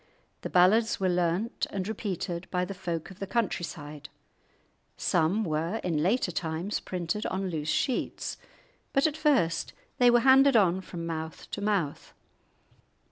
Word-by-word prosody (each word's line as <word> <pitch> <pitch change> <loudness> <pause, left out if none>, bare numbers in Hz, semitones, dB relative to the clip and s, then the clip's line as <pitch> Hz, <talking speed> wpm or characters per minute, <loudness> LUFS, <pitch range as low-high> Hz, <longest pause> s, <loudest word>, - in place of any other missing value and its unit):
The - - -4
ballads 210 +6 +4
were 190 -1 +1
learnt 180 +5 0
and 190 -1 -3
repeated 190 -5 -4
by 180 -1 0
the 195 - -6
folk 175 -3 -4
of 190 - -14
the 195 - -4
country 220 -4 0
side; 150 -3 -8 0.9
some 180 +5 +1
were 165 +2 -1
in 165 -4 0
later 195 +3 +1
times 165 +4 -2
printed 180 +3 -3
on 190 -1 -2
loose 155 -1 -3
sheets, 255 - -1 0.6
but 275 - +3
at 310 -2 +1
first 275 - +1 0.3
they 245 -1 +7
were 240 0 +5
handed 270 +1 +6
on 190 -4 +4
from 170 -2 -7
mouth 160 -1 -5
to 205 - -4
mouth. 200 -8 -1
185 Hz, 150 wpm, -28 LUFS, 165-215 Hz, 0.9 s, they